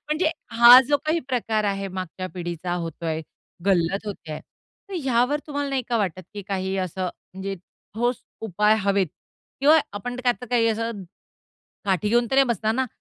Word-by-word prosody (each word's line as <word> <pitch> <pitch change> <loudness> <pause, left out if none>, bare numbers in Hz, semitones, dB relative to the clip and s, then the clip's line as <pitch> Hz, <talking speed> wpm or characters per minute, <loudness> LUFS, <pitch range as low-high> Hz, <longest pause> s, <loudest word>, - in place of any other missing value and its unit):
म्हणजे 310 +1 +2 0.3
हा 240 +2 +10
जो 290 - +4
काही 315 +2 +1
प्रकार 225 -4 0
आहे, 195 -1 -1
मागच्या 185 0 -5
पिढीचा 175 0 -4
होतोय, 165 -2 -3 0.5
गल्लत 195 +2 +1
होतेय, 160 -7 -6 0.5
तर 395 - -7
ह्यावर 260 +3 +2
तुम्हाला 285 -1 -2
नाही 270 -1 0
का 240 - +1
वाटत, 185 -3 -2
की 205 - -5
काही 190 -1 -2
असं 185 0 -3
म्हणजे 190 +2 -6 0.4
ठोस 240 +2 0 0.3
उपाय 210 +3 +3
हवेत 200 -1 +2 0.5
किंवा 300 +3 +6
आपण 245 +5 -5
आता 245 -1 0
काही 235 -2 +3
असं 225 -2 -2 0.8
काठी 195 0 +1
घेऊन 240 +2 +3
तर - - 0
नाही 275 0 +6
बसणार 220 -2 0
ना, 260 +1 0
210 Hz, 160 wpm, -24 LUFS, 185-245 Hz, 0.8 s, हा